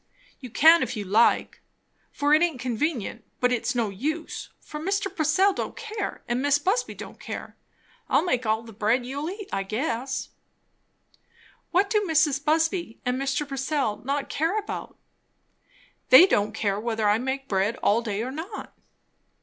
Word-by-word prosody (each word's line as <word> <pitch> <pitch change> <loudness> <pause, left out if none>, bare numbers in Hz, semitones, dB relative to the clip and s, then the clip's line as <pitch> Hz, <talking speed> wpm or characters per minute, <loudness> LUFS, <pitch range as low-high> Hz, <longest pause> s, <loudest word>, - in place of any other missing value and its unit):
"You 255 - -9
can 320 +8 +6
if - - -2
you 205 - -4
like, 215 +5 +2 0.5
for 290 +1 +1
it 310 - +5
aint 335 -7 +1
convenient; 250 0 -2 0.2
but 250 0 +2
it's 250 +2 -1
no 230 -3 +1
use; 310 - -4
for 300 - -8
Mr. 390 +3 -2
Purcell 335 +5 +3
don't - - -4
care, 435 -2 -5
and 240 +1 0
Mis' 285 0 +3
Busby 390 +11 -1
don't - - -10
care. - - -7 0.5
I'll - - +3
make 255 -8 0
all 220 0 0
the 225 -1 -12
bread 225 +4 +1
you'll 285 +5 -4
eat; 400 +1 -7
I - - 0
guess." 235 +5 -3 1.4
"What 395 +3 +2
do 425 -1 +3
Mrs. 295 -3 +2
Busby 320 - 0
and 250 +1 0
Mr. 275 +2 -1
Purcell 270 -5 -1
not 275 +2 -2
care 325 +8 0
about?" 425 - -5 1.1
"They 260 +8 +10
don't 210 - +1
care 200 -2 -1
whether 220 -1 -1
I 210 +2 +3
make 265 +2 -3
bread 200 +2 +1
all 215 +3 +3
day, 215 -2 -3
or 255 - -4
not." 335 +9 -7
275 Hz, 165 wpm, -25 LUFS, 230-320 Hz, 1.4 s, They